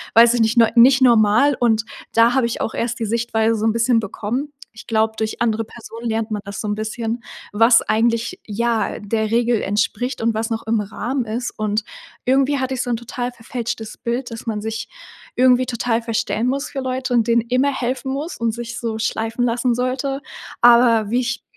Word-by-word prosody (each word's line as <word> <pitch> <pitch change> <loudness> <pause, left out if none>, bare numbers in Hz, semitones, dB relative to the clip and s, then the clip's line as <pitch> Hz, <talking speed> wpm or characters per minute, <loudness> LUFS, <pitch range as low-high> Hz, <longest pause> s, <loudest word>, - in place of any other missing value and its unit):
weiß 230 +1 +7
ich 240 - +1
nicht, 225 +2 +1
ne 230 -1 +5
nicht 255 +3 +6
normal.“ 240 +3 +5
Und 225 -2 +2 0.3
da 230 +1 +5
habe 265 -2 +2
ich 235 - -4
auch - - -2
erst 235 +1 -2
die 225 - -1
Sichtweise 225 0 0
so 215 0 -2
'n 225 - +3
bisschen 230 +1 +2
bekommen. 225 +7 -4 0.2
Ich 225 - -13
glaube, 220 -1 +1
durch 220 0 -3
andere 225 -1 +1
Personen 230 +1 -8
lernt 225 0 -2
man 210 -1 -2
das 200 0 -7
so 215 - -4
'n 205 - -1
bisschen, 225 +2 -4 0.3
was 230 +2 +5
eigentlich, 230 - 0
ja, 230 +2 -1
der 220 +1 -1
Regel 235 -1 +2
entspricht 220 +6 -1
und 225 0 +1
was 220 +1 -2
noch 225 -1 -3
im 225 0 +2
Rahmen 235 +5 -3
ist. 235 +3 -3
Und 215 0 -1 0.4
irgendwie 275 +2 +2
hatte 260 0 -2
ich 250 - -2
so - - -3
'n 235 - 0
total 245 +1 -5
verfälschtes 230 -2 -6
Bild, 245 +1 -3
dass 230 - -8
man 215 -2 -2
sich 220 +1 -5 0.5
irgendwie 255 0 +4
total 235 -1 -1
verstellen 230 0 -1
muss 275 +2 -1
für 280 - -5
Leute 260 0 -2
und 230 -2 +2
denen 235 0 +3
immer 255 +4 +1
helfen 265 +1 -3
muss 300 +6 -4
und 230 -1 0
sich 235 0 -6
so 225 -2 -3
schleifen 225 +1 -1
lassen 240 +1 +1
sollte. 260 +3 -2 0.4
Aber 235 -3 +5
wie 240 +3 +1
ich 240 -2 -3
235 Hz, 205 wpm, -20 LUFS, 220-245 Hz, 0.5 s, weiß